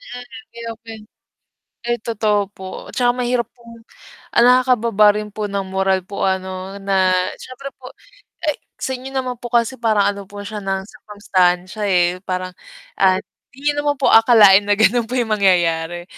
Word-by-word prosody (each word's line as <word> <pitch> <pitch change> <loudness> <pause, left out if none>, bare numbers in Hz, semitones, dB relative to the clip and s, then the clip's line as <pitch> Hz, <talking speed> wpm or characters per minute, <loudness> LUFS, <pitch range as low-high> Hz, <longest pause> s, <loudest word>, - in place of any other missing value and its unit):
Mm, 245 - -9 0.3
i-open. 225 -1 -8 0.8
Ay, 240 -1 -1
totoo 210 -3 0
po 190 - -12 0.3
tsaka 245 -1 +2
mahirap 240 -1 0
pong 230 -1 -15 0.5
nakakababa 235 -4 +4
rin 210 - -6
po 210 +1 -6
ng 195 -1 -3
moral 190 0 +1
po 200 - -4
ano 190 +1 -3
na 190 -1 +2 0.2
siyempre 255 +2 -10
po, 255 -1 -12 0.5
ay 300 -2 0 0.2
sa - - -4
inyo 260 - -9
naman 255 -2 -3
po 240 - -6
kasi 235 +1 0
parang 215 -3 +2
ano 200 -1 -9
po 205 0 -9
siya 210 +1 -6
ng 195 -1 -3
circumstancia, 200 -3 -1
eh. 180 -1 +2
Parang, 185 0 -3 0.5
at 190 -1 +3 0.3
hindi 290 +2 0
naman 290 0 -1
po 265 - +2
akalain 210 -3 +6
na 205 - +3
ganun 225 +2 +2
po 250 - -4
yung 235 -3 -1
mangyayari 175 -4 +1
210 Hz, 155 wpm, -19 LUFS, 190-240 Hz, 0.8 s, akalain